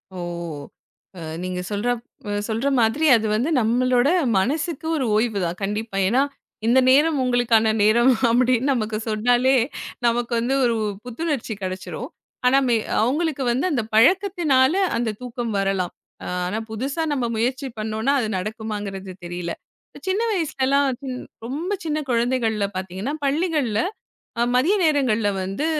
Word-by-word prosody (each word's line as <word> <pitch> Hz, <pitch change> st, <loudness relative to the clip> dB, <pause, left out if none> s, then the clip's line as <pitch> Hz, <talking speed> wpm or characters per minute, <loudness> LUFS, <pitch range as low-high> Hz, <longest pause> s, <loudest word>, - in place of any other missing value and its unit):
ஓ. -, -, -6 dB, 1.0 s
அ -, -, -7 dB, 0.2 s
நீங்க 185 Hz, 0 st, -3 dB
சொல்ற 205 Hz, +4 st, -1 dB, 0.6 s
சொல்ற 225 Hz, +5 st, -1 dB
மாதிரி, 260 Hz, +8 st, +2 dB
அது 220 Hz, -1 st, 0 dB
வந்து 250 Hz, +9 st, 0 dB
நம்மளோட 245 Hz, +3 st, +2 dB, 0.3 s
மனசுக்கு 300 Hz, -, -2 dB
ஒரு 265 Hz, -, 0 dB
ஓய்வு 215 Hz, -1 st, +1 dB
தான். 170 Hz, +1 st, -3 dB
கண்டிப்பா. 210 Hz, 0 st, -3 dB
ஏன்னா 245 Hz, +7 st, +3 dB, 0.5 s
இந்த 255 Hz, +3 st, +5 dB
நேரம் 295 Hz, +3 st, +4 dB
உங்களுக்கான 235 Hz, -3 st, +3 dB
நேரம் 235 Hz, +5 st, +5 dB, 0.2 s
அப்படின்னு 250 Hz, +2 st, +2 dB
நமக்கு 215 Hz, -3 st, -2 dB
சொன்னாலே, 245 Hz, +4 st, +3 dB, 0.5 s
நமக்கு 235 Hz, +1 st, +1 dB
வந்து 245 Hz, +3 st, 0 dB
ஒரு 235 Hz, -2 st, +2 dB, 0.3 s
புத்துணர்ச்சி 250 Hz, -2 st, -3 dB
கெடச்சுரும். 185 Hz, 0 st, -5 dB, 0.4 s
ஆனா, 255 Hz, +2 st, +5 dB, 0.4 s
அவுங்களுக்கு 285 Hz, +3 st, 0 dB
வந்து 255 Hz, +7 st, +1 dB
அந்தப் 230 Hz, -6 st, -2 dB
பழக்கத்துனால, 310 Hz, -, +4 dB, 0.2 s
அந்தத் 225 Hz, -3 st, -2 dB
தூக்கம் 240 Hz, -2 st, -4 dB
வரலாம். 195 Hz, -2 st, 0 dB, 0.5 s
ஆனா, 195 Hz, +5 st, -2 dB
புதுசா 270 Hz, +9 st, -2 dB
நம்ம 260 Hz, -4 st, 0 dB
முயற்சி 255 Hz, +5 st, -1 dB
பண்ணோம்னா, 220 Hz, +5 st, 0 dB
அது 230 Hz, -, -1 dB
நடக்குமாங்கறது 205 Hz, -2 st, -5 dB
தெரியல. 175 Hz, 0 st, -4 dB, 0.6 s
சின்ன 380 Hz, +3 st, +1 dB
வயசுலலாம், 280 Hz, -6 st, +1 dB, 0.6 s
ரொம்ப 295 Hz, +9 st, -4 dB
சின்னக் 305 Hz, -3 st, -3 dB
குழந்தைகள்ல 230 Hz, -4 st, +1 dB
பாத்தீங்கன்னா, 190 Hz, +8 st, -4 dB
பள்ளிகள்ல 285 Hz, -, +1 dB, 0.8 s
மதிய 325 Hz, +12 st, +3 dB
நேரங்கள்ல 255 Hz, -9 st, +2 dB
வந்து, 195 Hz, +12 st, -2 dB
240 Hz, 125 wpm, -22 LUFS, 215-275 Hz, 1.0 s, இந்த